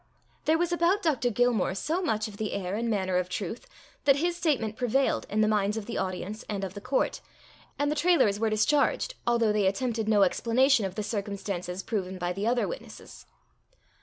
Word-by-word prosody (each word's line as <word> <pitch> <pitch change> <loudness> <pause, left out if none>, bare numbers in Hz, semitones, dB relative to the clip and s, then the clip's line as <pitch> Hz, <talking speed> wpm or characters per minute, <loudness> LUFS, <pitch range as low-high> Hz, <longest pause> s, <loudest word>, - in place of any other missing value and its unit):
There 315 +1 +4
was 350 +1 0
about 345 +4 +2
Dr. 270 -7 +1
Gilmore 235 -5 +1
so 320 - -1
much 220 - 0
of 205 -2 -11
the 215 -1 -3
air 185 -1 -3
and 230 +2 -1
manner 190 -4 0
of 180 0 -1
truth, 195 +4 -5 0.4
that 275 - +6
his 340 +4 0
statement 270 - 0
prevailed 255 +3 +1
in 215 +1 +1
the 215 - +4
minds 210 0 +1
of 220 - -4
the 235 - -3
audience 190 +4 -4
and 200 -2 -3
of 190 -1 -4
the 200 - -8
court, 265 - 0 0.6
and 290 +1 +1
the - - 0
Trailors 300 - +3
were 225 0 +1
discharged, 285 - +2
although 235 -2 +3
they 205 -2 +2
attempted 225 +1 -1
no 205 -2 +5
explanation 235 +3 +3
of 185 - -10
the 215 - -2
circumstances 200 -3 -4
proven 190 -4 -3
by 175 0 -2
the 200 +4 -2
other 240 0 +1
witnesses. - - -9
220 Hz, 195 wpm, -28 LUFS, 200-270 Hz, 0.6 s, that